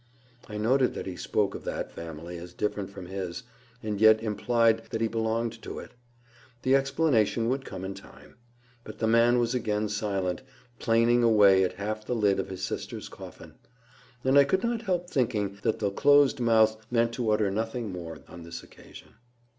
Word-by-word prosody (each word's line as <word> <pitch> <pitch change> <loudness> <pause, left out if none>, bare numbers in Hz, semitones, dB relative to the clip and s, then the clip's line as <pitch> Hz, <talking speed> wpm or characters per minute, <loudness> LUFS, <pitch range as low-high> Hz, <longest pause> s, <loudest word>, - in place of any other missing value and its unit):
I 105 - -5
noted 125 +5 +2
that - - -5
he 95 - -5
spoke 100 +2 -1
of - - -8
that - - -4
family 85 +1 -8
as 85 +1 -10
different 100 0 -2
from 100 -2 -9
his, 95 +4 -5 0.4
and 105 -1 -3
yet 110 0 +7
implied 115 +1 +1
that 115 - -3
he 115 - +1
belonged 115 +1 -2
to - - -7
it. - - -9 0.7
The 130 - +3
explanation 135 -5 +2
would 135 +1 -2
come 95 -1 -7
in 95 - -4
time. - - -15 0.5
But - - -10
the 115 - -1
man 115 +2 +4
was 120 0 +1
again 105 -3 -1
silent, 100 -3 -2 0.4
planing 115 +1 +3
away 100 -5 +5
at 90 - -1
half 110 +2 -4
the 125 - -2
lid 100 -4 +2
of 95 - -3
his 95 0 -7
sister's - - -5
coffin. - - -12 0.7
And 135 +2 +5
I - - +8
could 190 +7 0
not 235 -1 -1
help 180 -5 -1
thinking 105 - -1
that 110 - 0
the 100 -2 -1
closed 145 +4 +4
mouth 110 -2 +3
meant 115 -1 +1
to 115 -2 -2
utter 105 -2 +2
nothing 115 +1 -3
more 85 -3 -7
on 85 - -11
this 85 0 -8
occasion. - - -15
110 Hz, 185 wpm, -27 LUFS, 100-120 Hz, 0.7 s, I